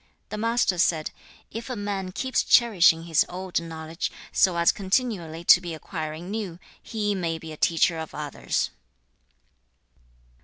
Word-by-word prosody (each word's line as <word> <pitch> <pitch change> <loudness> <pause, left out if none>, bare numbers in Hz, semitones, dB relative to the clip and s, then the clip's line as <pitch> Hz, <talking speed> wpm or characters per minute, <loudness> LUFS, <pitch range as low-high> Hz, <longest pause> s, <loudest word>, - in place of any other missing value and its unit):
The 210 - -5
Master 230 -5 +1
said, 160 -3 +2 0.4
'If 230 +4 -6
a 255 - -3
man 200 -3 -3
keeps 260 +7 0
cherishing 185 -9 +5
his 165 -2 +3
old 185 -1 -3
knowledge, 160 0 -5 0.2
so 185 -3 +3
as 170 0 +5
continually 190 -6 -1
to 180 - +7
be 170 -3 -5
acquiring 160 +2 -6
new, 205 -6 -4 0.2
he 210 -2 -2
may 170 -4 -2
be 160 0 -9
a - - -7
teacher 165 +1 +2
of 160 - -7
others.' 150 -2 -2
175 Hz, 145 wpm, -25 LUFS, 165-205 Hz, 0.4 s, to